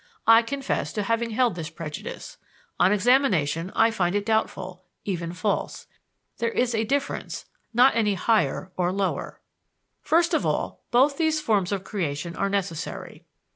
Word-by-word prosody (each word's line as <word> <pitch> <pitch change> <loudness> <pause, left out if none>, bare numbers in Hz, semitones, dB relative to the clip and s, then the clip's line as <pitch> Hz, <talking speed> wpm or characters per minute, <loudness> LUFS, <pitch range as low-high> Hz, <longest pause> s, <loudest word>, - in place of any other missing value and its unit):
I 225 0 +8
confess 275 +3 -3
to 210 - -1
having 230 +3 0
held 235 0 +2
this 165 -2 -5
prejudice. 155 -1 -7 0.4
On 180 +2 +5
examination, 195 - +2
I 225 0 +4
find 185 -4 0
it 205 0 0
doubtful, 185 -4 -1 0.2
even 170 -4 -3
false. 200 +4 -2 0.5
There 235 - +1
is 245 +1 0
a 220 0 +1
difference, 280 +4 -2 0.3
not 245 +2 +5
any 210 -3 +2
"higher" 190 -4 +1
and 180 +2 0
"lower." 195 -2 -2 0.6
First 335 +1 +2
of - - +2
all, - - -2
both 270 +4 +3
these 315 -1 +2
forms 210 -10 +1
of 195 -2 -2
creation 170 -4 -3
are 200 - 0
necessary. 195 -5 -4
205 Hz, 150 wpm, -25 LUFS, 180-235 Hz, 0.6 s, I